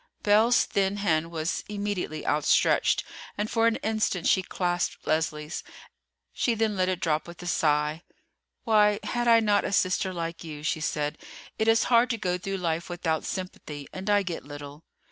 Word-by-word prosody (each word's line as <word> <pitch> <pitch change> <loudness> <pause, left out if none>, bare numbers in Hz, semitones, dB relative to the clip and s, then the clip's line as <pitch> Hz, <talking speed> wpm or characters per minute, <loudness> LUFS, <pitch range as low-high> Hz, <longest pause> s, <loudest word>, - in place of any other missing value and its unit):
Belle's 220 +4 +4
thin 195 0 0
hand 165 -5 +1
was 165 +1 -2
immediately 200 -7 -3
outstretched, 150 0 +3 0.3
and 210 +1 -2
for 230 0 +3
an 230 - +2
instant 215 -5 0
she 190 - +4
clasped 175 -1 -2
Leslie's—she 155 - -3
then 220 -1 0
let 185 -1 +1
it 185 -2 -1
drop 155 -1 0
with 170 0 -11
a - - -8
sigh. 150 -2 +1 0.6
"Why 210 -2 +4
had 240 -1 -1
I 230 -1 +6
not 205 -2 +2
a - - -2
sister 185 0 +1
like 170 -1 -5
you?" 150 -2 -8
she 155 - 0
said. 150 -1 -2 0.4
"It 220 - +1
is 225 0 +5
hard 240 0 +4
to 230 - -1
go 180 -4 -1
through 195 +2 -3
life 170 -1 -2
without 170 -2 -2
sympathy, 155 -6 -6
and 190 +2 -5
I 205 -1 +4
get 175 -3 -5
little." 145 +1 -10
185 Hz, 170 wpm, -27 LUFS, 160-210 Hz, 0.6 s, I